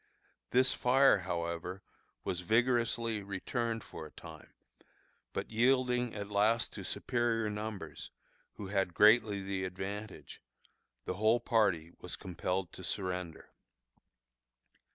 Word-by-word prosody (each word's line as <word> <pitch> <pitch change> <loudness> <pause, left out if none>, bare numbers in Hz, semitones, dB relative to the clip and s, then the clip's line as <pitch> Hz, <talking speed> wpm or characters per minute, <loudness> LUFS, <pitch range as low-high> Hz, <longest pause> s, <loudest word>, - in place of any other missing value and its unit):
This 130 +1 +4
fire, 130 -2 +5
however, 85 +1 -4 0.4
was 90 - -2
vigorously 115 +2 +1
returned 110 +4 -3
for 80 - -8
a - - -18
time, - - -12 0.8
but - - -4
yielding 125 0 +2
at 100 -1 -5
last 110 +3 +2
to - - -6
superior 115 -3 0
numbers, 105 -1 -5 0.5
who 100 - -7
had 95 -3 0
greatly 105 -2 +5
the 95 -1 -2
advantage, 95 +3 -6 0.6
the - - -2
whole 110 +3 +4
party 100 -9 +1
was 90 - -5
compelled 90 0 -3
to - - -9
surrender. 90 -4 -4
105 Hz, 110 wpm, -33 LUFS, 95-115 Hz, 0.8 s, fire